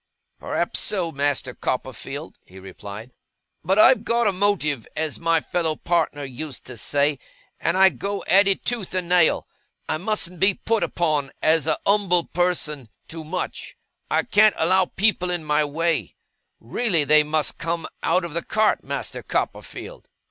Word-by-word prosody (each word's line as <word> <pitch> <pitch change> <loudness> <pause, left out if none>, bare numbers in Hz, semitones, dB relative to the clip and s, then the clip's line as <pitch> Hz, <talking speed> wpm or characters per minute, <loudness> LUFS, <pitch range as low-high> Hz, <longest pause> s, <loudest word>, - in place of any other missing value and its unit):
'Perhaps - - -2
so, 185 -6 -1
Master 140 -3 -1
Copperfield,' 130 +5 -5
he 95 - -16
replied. 100 - -10 0.5
'But 190 +2 +1
I've 250 +4 +6
got 235 0 +2
a 205 - +4
motive, 180 - 0
as 160 -2 -3
my 165 -1 +2
fellow 165 -2 -1
partner 160 -4 -1
used 135 +1 -7
to 125 - -8
say; 140 +5 0 0.4
and 170 +2 0
I 190 0 +7
go 200 +1 -4
at 195 +4 +5
it 195 - +1
tooth 225 -7 -2
and 180 -2 -1
nail. 175 -2 +3 0.4
I 155 - -1
mustn't 180 -3 -2
be 195 0 +3
put 225 -2 0
upon, 150 -5 0
as 160 -2 +3
a - - +2
numble 195 -4 +3
person, 155 -7 -1 0.2
too 160 -1 -7
much. 180 +4 -5 0.3
I - - +2
can't 215 0 +4
allow 185 +3 +3
people 190 -2 0
in 175 -2 -2
my 150 0 +2
way. 165 +3 -1 0.4
Really 195 -11 +1
they 150 +1 +6
must 150 0 -1
come 165 0 -2 0.2
out 175 +2 +1
of 170 - -7
the 170 - -2
cart, 215 0 +1
Master - - -5
Copperfield! - - -5
165 Hz, 160 wpm, -23 LUFS, 150-190 Hz, 0.5 s, I